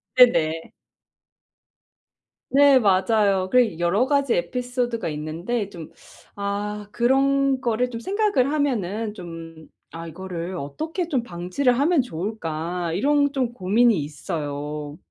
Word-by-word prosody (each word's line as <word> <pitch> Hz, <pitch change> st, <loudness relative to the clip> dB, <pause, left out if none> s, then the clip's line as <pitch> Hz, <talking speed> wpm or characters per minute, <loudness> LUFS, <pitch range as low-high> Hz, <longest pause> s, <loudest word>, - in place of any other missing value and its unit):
네네. 165 Hz, -10 st, +4 dB, 1.8 s
네, 280 Hz, -1 st, +6 dB
맞아요. 195 Hz, -2 st, +2 dB
그리고 235 Hz, -9 st, +3 dB
여러 180 Hz, +8 st, +2 dB
가지 280 Hz, -2 st, +2 dB
에피소드가 245 Hz, +4 st, -2 dB
있는데 165 Hz, +9 st, -3 dB
좀 170 Hz, -5 st, -10 dB, 0.5 s
아 205 Hz, +1 st, -3 dB
그런 270 Hz, +2 st, +2 dB
거를 245 Hz, 0 st, 0 dB
좀 230 Hz, -2 st, -6 dB
생각을 380 Hz, -, +1 dB
하면은 225 Hz, -, -1 dB
좀 165 Hz, -4 st, -10 dB, 0.2 s
'아 165 Hz, +2 st, -7 dB
이거를 180 Hz, +1 st, -6 dB
어떻게 315 Hz, -, -4 dB
좀 265 Hz, -7 st, 0 dB
방지를 235 Hz, +6 st, 0 dB
하면 310 Hz, +1 st, +3 dB
좋을까.' 170 Hz, -5 st, -4 dB
이런 285 Hz, -, +2 dB
좀 255 Hz, -4 st, 0 dB
고민이 215 Hz, +1 st, +3 dB
있어요. 150 Hz, -1 st, -5 dB
210 Hz, 240 characters per minute, -23 LUFS, 170-255 Hz, 1.8 s, 네